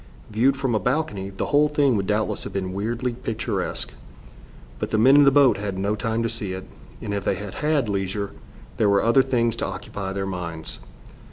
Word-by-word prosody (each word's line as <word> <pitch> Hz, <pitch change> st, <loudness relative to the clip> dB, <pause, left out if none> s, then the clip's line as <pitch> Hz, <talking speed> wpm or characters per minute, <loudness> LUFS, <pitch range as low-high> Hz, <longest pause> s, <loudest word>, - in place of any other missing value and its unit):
Viewed 130 Hz, +6 st, +3 dB
from 135 Hz, -3 st, 0 dB
a 110 Hz, -, +2 dB
balcony, 125 Hz, -8 st, -1 dB
the 95 Hz, -, -3 dB
whole 150 Hz, +1 st, +5 dB
thing 145 Hz, -4 st, +3 dB
would 100 Hz, -2 st, -1 dB
doubtless 105 Hz, 0 st, 0 dB
have -, -, -6 dB
been 95 Hz, -1 st, -3 dB
weirdly 115 Hz, +5 st, -2 dB
picturesque. 115 Hz, -2 st, -3 dB, 0.9 s
But -, -, -2 dB
the -, -, +1 dB
men 130 Hz, +6 st, +6 dB
in 145 Hz, 0 st, +7 dB
the -, -, +8 dB
boat 140 Hz, -2 st, +5 dB
had 100 Hz, -2 st, -4 dB
no 100 Hz, +2 st, 0 dB
time 115 Hz, +1 st, -1 dB
to -, -, +1 dB
see 105 Hz, -4 st, -4 dB
it, 95 Hz, 0 st, -6 dB, 0.4 s
and 105 Hz, -, -3 dB
if 100 Hz, -1 st, -2 dB
they -, -, +1 dB
had 100 Hz, 0 st, -7 dB
had 150 Hz, -5 st, +2 dB
leisure 100 Hz, 0 st, -2 dB, 0.5 s
there 105 Hz, -, +3 dB
were 100 Hz, 0 st, +3 dB
other 115 Hz, +4 st, +5 dB
things 120 Hz, -3 st, +1 dB
to -, -, -1 dB
occupy 95 Hz, -1 st, -5 dB
their 95 Hz, 0 st, -2 dB
minds. 85 Hz, -4 st, -5 dB
110 Hz, 205 wpm, -24 LUFS, 100-125 Hz, 0.9 s, the